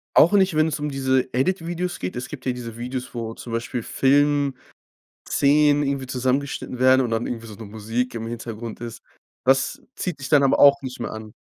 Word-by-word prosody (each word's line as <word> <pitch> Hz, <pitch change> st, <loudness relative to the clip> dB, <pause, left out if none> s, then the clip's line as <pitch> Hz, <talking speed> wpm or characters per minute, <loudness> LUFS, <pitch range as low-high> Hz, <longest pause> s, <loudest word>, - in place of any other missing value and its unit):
Auch 165 Hz, -, +7 dB
nicht, 190 Hz, -4 st, +4 dB
wenn 155 Hz, +1 st, +4 dB
es 150 Hz, -1 st, -2 dB
um 150 Hz, 0 st, -2 dB
diese 130 Hz, -2 st, +1 dB
Edit-Videos 175 Hz, +5 st, -1 dB
geht? 90 Hz, -, -4 dB
Es 125 Hz, -, -4 dB
gibt -, -, -9 dB
ja 130 Hz, -, +1 dB
diese 115 Hz, -2 st, -7 dB
Videos, 125 Hz, +1 st, -5 dB
wo 115 Hz, -2 st, -4 dB
zum 115 Hz, -, -8 dB
Beispiel 115 Hz, +1 st, -3 dB
Filmszenen 140 Hz, 0 st, +2 dB, 1.3 s
irgendwie 140 Hz, -2 st, -2 dB
zusammengeschnitten 130 Hz, 0 st, -2 dB
werden 130 Hz, +1 st, +5 dB
und 120 Hz, -, -1 dB
dann 115 Hz, +1 st, -1 dB
irgendwie 115 Hz, -1 st, -5 dB
so 105 Hz, -, -9 dB
'ne 110 Hz, +1 st, -9 dB
Musik 115 Hz, +4 st, -3 dB
im 115 Hz, -, -4 dB
Hintergrund 115 Hz, -1 st, -6 dB
ist. 115 Hz, -1 st, -7 dB, 0.4 s
Das 135 Hz, +1 st, +2 dB
zieht 180 Hz, -6 st, -4 dB
dich 135 Hz, -, -6 dB
dann 145 Hz, -2 st, +5 dB
aber 135 Hz, -, +3 dB
auch 140 Hz, 0 st, +7 dB
nicht 130 Hz, -1 st, -7 dB
mehr -, -, -4 dB
an? 110 Hz, -1 st, -8 dB
130 Hz, 200 wpm, -23 LUFS, 115-140 Hz, 1.3 s, Auch